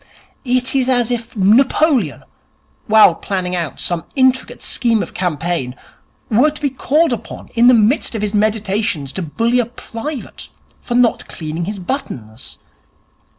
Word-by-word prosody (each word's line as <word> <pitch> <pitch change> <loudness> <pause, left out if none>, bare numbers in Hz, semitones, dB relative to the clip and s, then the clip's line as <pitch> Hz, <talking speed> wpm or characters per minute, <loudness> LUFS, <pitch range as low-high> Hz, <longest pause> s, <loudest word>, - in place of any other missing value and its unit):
It 255 -1 0
is 260 -1 +1
as 245 -2 +2
if 235 -1 -4
Napoleon, 225 - +3 0.6
while 215 -4 +7
planning 180 +1 -3
out 170 -5 -4
some 175 -2 -1
intricate 260 -1 +1
scheme 230 -3 +1
of - - -9
campaign, 165 -6 -2 0.5
were 245 +8 +4
to 300 - -9
be 285 -2 -1
called 285 +3 +1
upon 230 -1 -8
in 240 0 +4
the 250 - +7
midst 225 +3 +2
of 215 - -3
his 210 0 -1
meditations 205 -8 0
to 190 - -3
bully 230 +9 0
a 245 - +2
private 245 +3 -7 0.3
for 240 - -4
not 245 -1 +2
cleaning 160 +1 -5
his 205 +2 -4
buttons. 130 - -6
225 Hz, 150 wpm, -17 LUFS, 180-250 Hz, 0.6 s, while